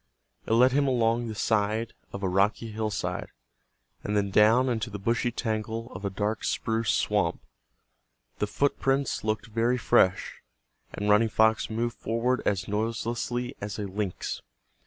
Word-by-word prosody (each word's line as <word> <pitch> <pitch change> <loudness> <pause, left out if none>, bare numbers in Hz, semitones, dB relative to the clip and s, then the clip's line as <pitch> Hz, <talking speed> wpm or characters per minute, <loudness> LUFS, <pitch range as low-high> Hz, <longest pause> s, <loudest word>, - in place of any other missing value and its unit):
It - - +1
led 125 +3 +6
him 140 +1 +2
along 120 -2 +1
the 110 - -5
side 110 +2 0 0.2
of 100 - -7
a - - +2
rocky 100 +4 +1
hillside, 110 -1 -3 0.7
and 105 0 -1
then 100 -1 0
down 110 +6 +5
into 120 -1 -1
the 105 - -5
bushy 115 +4 0
tangle 115 0 -3
of 95 - -8
a 100 - 0
dark 105 +3 -2
spruce 115 -1 -1
swamp. - - +1 1.0
The 105 - 0
footprints 135 +2 0
looked 110 +1 -1
very 115 +2 +1
fresh, 95 -5 +2 0.5
and 105 - -4
Running 105 +2 +4
Fox 110 +1 +3
moved 115 +2 -2
forward 115 +3 0
as 95 -2 0
noiselessly 115 +3 -2
as 100 -1 -4
a 105 - -3
lynx. 100 -1 -4
110 Hz, 150 wpm, -27 LUFS, 105-120 Hz, 1.0 s, led